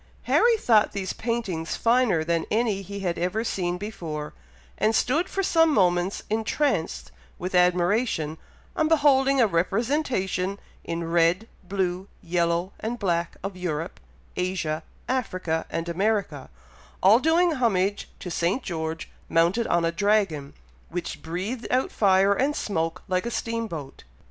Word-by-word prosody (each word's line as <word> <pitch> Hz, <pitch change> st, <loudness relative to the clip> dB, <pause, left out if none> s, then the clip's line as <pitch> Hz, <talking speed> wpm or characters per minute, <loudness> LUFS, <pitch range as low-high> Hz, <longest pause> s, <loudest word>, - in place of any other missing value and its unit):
Harry 470 Hz, -1 st, +4 dB
thought 220 Hz, -, +3 dB
these 195 Hz, -2 st, -3 dB
paintings 200 Hz, -9 st, -2 dB
finer 230 Hz, -8 st, +2 dB
than 165 Hz, 0 st, -1 dB
any 215 Hz, -3 st, +1 dB
he 200 Hz, +1 st, -7 dB
had 175 Hz, -3 st, -2 dB
ever 185 Hz, +6 st, -1 dB
seen 180 Hz, -5 st, -1 dB
before, 165 Hz, -7 st, -6 dB, 0.5 s
and 220 Hz, +1 st, +2 dB
stood 295 Hz, -, +1 dB
for 390 Hz, -, -1 dB
some 325 Hz, -3 st, +4 dB
moments 180 Hz, -5 st, +2 dB
entranced 220 Hz, -, -1 dB, 0.3 s
with 180 Hz, +1 st, -5 dB
admiration, 180 Hz, -2 st, +2 dB, 0.4 s
on 315 Hz, -, +2 dB
beholding 275 Hz, -3 st, +4 dB
a 240 Hz, -, +6 dB
representation 200 Hz, -, 0 dB, 0.2 s
in 170 Hz, 0 st, -3 dB
red, 170 Hz, +5 st, +3 dB, 0.2 s
blue, 185 Hz, 0 st, -2 dB, 0.2 s
yellow, 170 Hz, +2 st, 0 dB
and 230 Hz, +2 st, -3 dB
black, 170 Hz, -5 st, -1 dB
of 195 Hz, -1 st, -4 dB
Europe, 170 Hz, -3 st, -4 dB, 0.4 s
Asia, 180 Hz, -4 st, -1 dB, 0.3 s
Africa, 185 Hz, -10 st, -1 dB
and 165 Hz, +1 st, -3 dB
America, 185 Hz, -5 st, -1 dB, 0.5 s
all 205 Hz, +5 st, +7 dB
doing 335 Hz, +4 st, +3 dB
homage 205 Hz, -, 0 dB
to 180 Hz, -, -6 dB
St. 175 Hz, +10 st, 0 dB
George 160 Hz, -2 st, -4 dB, 0.2 s
mounted 170 Hz, +8 st, +2 dB
on 170 Hz, -1 st, +2 dB
a 165 Hz, -, +1 dB
dragon, 195 Hz, -7 st, 0 dB, 0.3 s
which 170 Hz, -3 st, -5 dB
breathed 190 Hz, -, -4 dB
out 255 Hz, +1 st, +1 dB
fire 195 Hz, -1 st, +4 dB
and 275 Hz, +7 st, 0 dB
smoke 165 Hz, -3 st, -2 dB
like 185 Hz, +3 st, 0 dB
a -, -, -1 dB
steam 230 Hz, -1 st, -2 dB
boat. 150 Hz, -8 st, -8 dB
190 Hz, 140 wpm, -25 LUFS, 170-230 Hz, 0.5 s, all